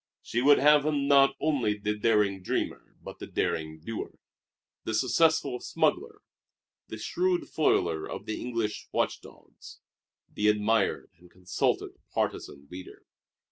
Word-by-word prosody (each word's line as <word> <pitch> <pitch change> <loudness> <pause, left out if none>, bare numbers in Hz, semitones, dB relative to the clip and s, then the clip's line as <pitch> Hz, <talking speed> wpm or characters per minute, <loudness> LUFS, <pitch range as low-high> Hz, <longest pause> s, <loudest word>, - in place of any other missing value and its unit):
She 120 - -1
would 145 +2 +6
have 150 +1 +5
him 145 -2 0
not 135 -1 +5
only 130 -9 0
the 105 +1 -2
daring 105 -3 +1
dreamer 90 - -3
but - - -10
the - - -7
daring 80 0 -2
doer 110 +6 -6 0.7
the 110 - -2
successful 130 +2 +2
smuggler, - - -1 0.6
the 110 - -7
shrewd 175 +12 -1
foiler 85 - +1
of - - -7
the 110 - -4
English 115 -3 -3
watch - - -1
dogs, - - -15 0.5
the 105 - -1
admired 105 +1 +1
and 90 0 -18
consulted 90 0 -2
partisan 70 0 -3
leader. 90 +1 -10
110 Hz, 135 wpm, -28 LUFS, 100-140 Hz, 0.7 s, would